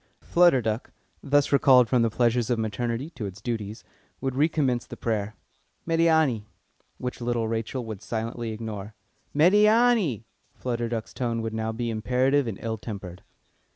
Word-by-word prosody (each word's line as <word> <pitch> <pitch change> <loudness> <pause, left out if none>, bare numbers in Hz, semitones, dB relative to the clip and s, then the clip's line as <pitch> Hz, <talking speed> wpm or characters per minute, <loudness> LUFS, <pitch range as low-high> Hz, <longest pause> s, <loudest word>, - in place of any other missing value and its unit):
Flutter 170 -8 +4
Duck, 110 +2 -2 0.3
thus 145 0 +2
recalled 130 -3 +6
from 125 0 +2
the 115 - +3
pleasures 120 0 +1
of 120 - +2
maternity 115 +6 -2
to 115 -9 -5
its 95 0 -9
duties, 110 0 -4 0.4
would 135 -1 -2
recommence 140 -4 +1
the - - -9
prayer. 105 -2 -2 0.5
"Médiâni!" 160 -9 +3 0.5
Which 125 0 -5
little 120 -1 0
Rachel 115 +3 -3
would 110 -3 -7
silently 115 +1 -4
ignore. 110 -2 -6 0.4
"Médiâni!" 210 - +4 0.3
Flutter 120 -2 -2
Duck's 115 -2 -4
tone 115 -2 -2
would 115 -1 -3
now 110 0 -2
be 115 +1 -3
imperative 125 +5 +1
and 105 -4 -4
ill 110 -1 -3
tempered. 100 -5 -7
120 Hz, 150 wpm, -26 LUFS, 110-135 Hz, 0.5 s, recalled